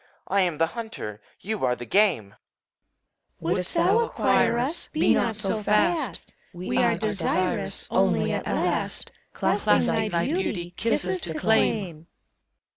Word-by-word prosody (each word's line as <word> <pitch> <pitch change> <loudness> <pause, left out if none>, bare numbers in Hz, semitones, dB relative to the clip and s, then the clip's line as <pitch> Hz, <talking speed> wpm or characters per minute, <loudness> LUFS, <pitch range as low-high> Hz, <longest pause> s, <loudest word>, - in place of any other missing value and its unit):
I 195 +1 +2
am 175 -4 0
the 165 - +3
hunter. 220 - -7 0.2
You 215 +1 -4
are 125 -1 +2
the 120 - -8
game. 150 - +2 1.1
CHORUS. 165 +2 -1
Wouldst 185 - -1
thou 395 +6 +3
acquire 460 - +2
us, 270 +8 -1
Be 310 - +3
not 230 -2 0
so 215 +1 -2
fast! 225 - 0 0.2
We 180 +7 -2
are 235 -2 +3
desirous 185 -4 -1
Only, - - +2
at - - -3
last, - - -1 0.2
Clasping 220 -1 +1
thy 170 -3 0
beauty. 215 - -2
Kisses 185 -4 0
to 160 -2 -4
claim! 185 -4 0
200 Hz, 135 wpm, -25 LUFS, 170-230 Hz, 1.1 s, the